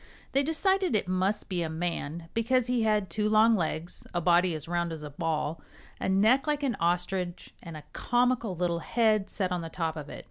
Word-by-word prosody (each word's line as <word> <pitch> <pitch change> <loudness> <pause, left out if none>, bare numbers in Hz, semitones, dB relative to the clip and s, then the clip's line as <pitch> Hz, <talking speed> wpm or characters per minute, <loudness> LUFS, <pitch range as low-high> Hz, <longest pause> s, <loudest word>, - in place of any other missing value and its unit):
They 275 - +3
decided 365 - +1
it 205 - +1
must 185 +3 0
be 180 -2 -2
a 165 - -2
man, 165 -1 -3
because 240 +2 +2
he 245 -1 0
had 210 -3 +2
two 210 +4 -1
long 220 +1 +5
legs, 170 -2 -3
a - - +2
body 175 0 +3
as 155 - -7
round 170 0 -1
as 160 -2 -6
a 150 - -7
ball, 155 0 -2 0.4
a - - -1
neck 220 +9 +4
like 295 -1 0
an 255 -5 0
ostrich 180 +1 -1
and 165 -2 -8
a 150 - -10
comical 245 -4 +1
little 170 -1 0
head 215 +1 +1
set 185 -3 -2
on 180 -1 -1
the 165 - -6
top 160 -1 -2
of 150 -2 -7
it. - - -8
185 Hz, 210 wpm, -28 LUFS, 170-225 Hz, 0.4 s, long